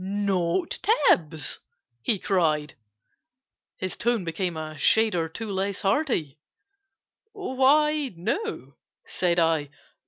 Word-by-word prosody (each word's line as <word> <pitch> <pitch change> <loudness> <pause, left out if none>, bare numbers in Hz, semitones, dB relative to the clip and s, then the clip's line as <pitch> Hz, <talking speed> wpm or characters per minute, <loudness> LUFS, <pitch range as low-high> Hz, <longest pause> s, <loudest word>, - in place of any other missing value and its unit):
"Not 190 -3 -1
Tibbs!" 170 - +2 0.4
he 210 - +1
cried—his 165 - -4
tone 235 -3 0
became 170 0 -3
A 155 0 -6
shade 220 +7 +3
or 165 -2 -1
two 220 +5 -6
less 195 0 -2
hearty— 195 - 0 0.9
"Why, 300 -4 +2
no," 325 - -4 0.3
said 175 -1 0
I. 160 -4 +2
190 Hz, 95 wpm, -25 LUFS, 160-245 Hz, 0.9 s, shade